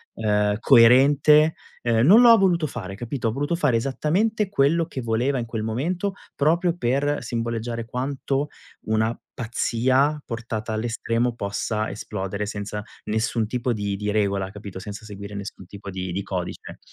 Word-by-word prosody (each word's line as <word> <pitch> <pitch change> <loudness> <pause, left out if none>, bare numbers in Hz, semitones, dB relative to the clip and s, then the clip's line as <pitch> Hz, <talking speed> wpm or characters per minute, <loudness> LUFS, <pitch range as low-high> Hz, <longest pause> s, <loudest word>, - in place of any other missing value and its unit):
ehm, 105 -1 +1
coerente, 140 +7 +6 0.3
ehm, 115 0 +2
non 215 +9 +8
lo 240 - +8
ha 230 - +9
voluto 175 -5 +2
fare, 95 -8 -6
capito, 120 +2 -3
ha - - -1
voluto 145 +7 -1
fare 145 -8 +2
esattamente 185 - 0
quello 165 -1 +2
che 135 -5 -6
voleva 120 +4 0
in 115 - -3
quel 115 -1 -4
momento 170 - -2 0.2
proprio 170 +4 +2
per 140 +2 0
simboleggiare 115 0 -3
quanto 135 +3 -2 0.4
una 110 +1 +1 0.2
pazzia 130 +5 +1
portata 115 -2 -4
all'estremo 115 +1 -1
possa 105 +1 -2
esplodere 100 0 -4
senza 105 0 -5 0.2
nessun 110 +1 0
tipo 125 +3 -2
di 105 -3 -2
di 105 +1 -3
regola, 100 -2 0
capito, 100 -2 -9
senza 105 +2 -8
seguire 100 0 -8
nessun 100 -2 -7
tipo 100 +1 -9
di 95 -1 -4
di 100 +3 -3
codice. 90 -3 -5
115 Hz, 150 wpm, -24 LUFS, 105-140 Hz, 0.4 s, ha